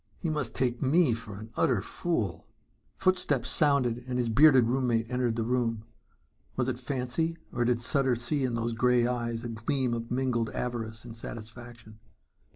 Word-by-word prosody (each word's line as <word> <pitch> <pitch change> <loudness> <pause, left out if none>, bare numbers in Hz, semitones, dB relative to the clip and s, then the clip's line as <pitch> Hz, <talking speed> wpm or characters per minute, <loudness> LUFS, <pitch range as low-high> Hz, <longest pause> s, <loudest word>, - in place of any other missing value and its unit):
"He 165 - -2
must 135 -7 -3
take 125 -2 0
me 145 0 +4
for 110 -3 -7
an 110 +2 -10
utter 120 -6 +2
fool!" 110 - -2 0.5
Footsteps 180 -9 +1
sounded 130 -5 +2
and 125 -1 -2
his 120 -2 0
bearded 130 +1 +6
roommate 120 -2 +1
entered 125 -2 0
the 115 - -1
room. 115 -2 0 0.7
Was 125 -1 0
it 125 -1 -2
fancy 135 +6 -2 0.2
or 120 0 +1
did 120 -1 +2
Sutter 130 +1 +2
see 130 +5 -1
in 125 -2 0
those 115 0 -1
grey 125 +1 +3
eyes 120 -2 -2
a 120 - -4
gleam 120 +3 -1
of 115 0 -4
mingled 125 -3 0
avarice 115 -2 -4
and 115 -2 -9
satisfaction? 115 -1 -10
120 Hz, 165 wpm, -29 LUFS, 115-130 Hz, 0.7 s, bearded